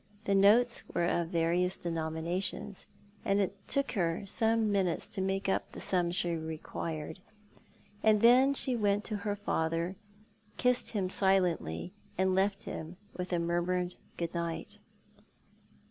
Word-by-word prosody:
The 200 - +1
notes 220 +5 +5
were 170 - +2
of 170 -1 +1
various 175 +2 +1
denominations, 170 +4 -3 0.4
and 195 +1 +2
it 195 0 0
took 275 0 0
her 175 -2 -1
some 225 +1 +1
minutes 190 -4 0
to 190 - -4
make 195 +1 -1
up 190 - -1
the - - -7
sum 180 -2 +1
she 175 0 0
required; 160 0 -5 0.8
and 215 -1 +4
then 255 +4 +6
she 260 -2 +1
went 205 -2 +1
to 215 -1 -3
her 205 0 -2
father, 170 -2 -1 0.6
kissed 250 -1 +2
him 195 -4 0
silently, 180 - +1 0.2
and 190 0 +2
left 195 +1 +1
him 165 +3 -6 0.2
with 180 0 -4
a 175 - +2
murmured 175 +1 0 0.2
good 170 -1 -3
night. 170 -1 -4
185 Hz, 140 wpm, -31 LUFS, 170-205 Hz, 0.8 s, then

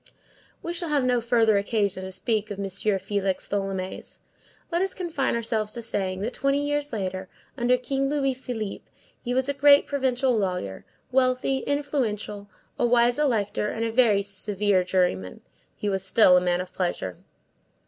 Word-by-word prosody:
We 340 - -3
shall 345 -1 -3
have 290 -3 +2
no 250 -1 +2
further 225 -3 +3
occasion 200 -2 -1
to 190 - -6
speak 215 +1 -1
of 205 - -5
M. 200 - -3
Félix 195 0 -1
Tholomyès. 195 -2 -4 0.5
Let 340 +1 +1
us 385 0 0
confine 330 -10 -1
ourselves 220 -2 -1
to 235 - -2
saying, 190 -4 -1
that, 230 +5 -3
twenty 275 +1 +1
years 290 0 -1
later, 190 -3 -4 0.3
under 250 -1 +2
King 270 +2 -1
Louis 275 -2 +1
Philippe, 240 -5 -6 0.4
he 245 0 -2
was 260 0 +2
a 280 - 0
great 285 +1 +6
provincial 260 -2 +1
lawyer, 180 - -2 0.3
wealthy 255 +1 +2
and 285 - +2
influential, 215 -8 -3 0.3
a - - +3
wise 240 +2 +3
elector, 220 -8 0
and 225 0 -2
a 225 - -1
very 220 -4 +4
severe 200 -1 0
juryman; 180 - -1 0.3
he 210 - -4
was 195 -2 0
still 190 -1 +6
a 180 - +5
man 180 0 +1
of 180 - -9
pleasure. 135 - -3
225 Hz, 170 wpm, -25 LUFS, 195-260 Hz, 0.5 s, great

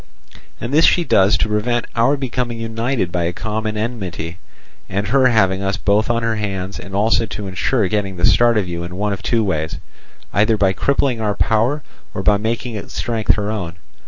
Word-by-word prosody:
And 120 +3 -4
this 160 +3 +6
she 175 - +4
does 100 - +4
to - - 0
prevent 115 +3 0
our 125 +5 +3
becoming 125 -3 -3
united 115 -3 -2
by 85 -1 0
a 85 - -1
common 110 +2 -3
enmity, 90 -7 -4 0.5
and 100 +1 -2
her 130 +2 +5
having 95 -5 +2
us 100 +1 -1
both 105 +1 +1
on 115 0 +1
her 115 -1 0
hands, 95 -2 -4
and 95 +1 -8
also 110 +2 +2
to 105 0 -6
ensure 100 +3 0
getting 100 -1 -1
the 85 - +2
start 115 +2 +4
of 100 -4 0
you 85 0 -4
in 90 +1 -7
one 105 +1 -1
of 100 - -6
two 115 0 +1
ways, 80 -5 -2 0.6
either 110 +2 +3
by 95 -2 +3
crippling 130 +2 +1
our 105 -2 0
power 120 +7 +1 0.3
or 95 - -3
by 105 0 +4
making 115 +3 -2
its 105 - -7
strength 115 -4 +1
her 105 0 -2
own. 90 -6 -4
105 Hz, 200 wpm, -19 LUFS, 95-115 Hz, 0.6 s, this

